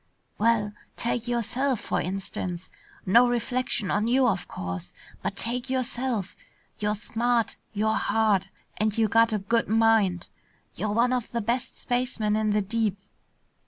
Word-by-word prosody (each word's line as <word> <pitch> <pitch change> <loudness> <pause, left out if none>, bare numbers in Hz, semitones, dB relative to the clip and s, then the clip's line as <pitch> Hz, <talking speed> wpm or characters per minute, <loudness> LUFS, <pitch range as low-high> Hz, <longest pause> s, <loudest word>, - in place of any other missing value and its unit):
"Well, 215 -2 +2 0.2
take 235 0 -1
yourself, 240 +2 0
for - - -1
instance. 185 -1 -4 0.3
No 235 +6 +6
reflection 240 -3 -1
on 210 +2 +1
you, 255 +1 +4
of 190 -6 0
course, 90 -1 -6 0.3
but - - -3
take 245 +3 -1
yourself. 250 -5 -2 0.4
You're 210 0 0
smart, 230 +2 0 0.2
you're 220 +1 +1
hard, 215 -4 +2 0.3
and 215 0 0
you 225 -1 +4
got 230 +2 +4
a 215 - +1
good 230 +4 0
mind. 220 -5 +3 0.5
You're 215 +3 -2
one 240 +3 +3
of 250 -3 -2
the 235 - -1
best 240 +4 -2
spacemen 245 -4 0
in 215 0 +1
the 210 0 +2
deep. 215 -1 0
225 Hz, 145 wpm, -26 LUFS, 205-240 Hz, 0.5 s, No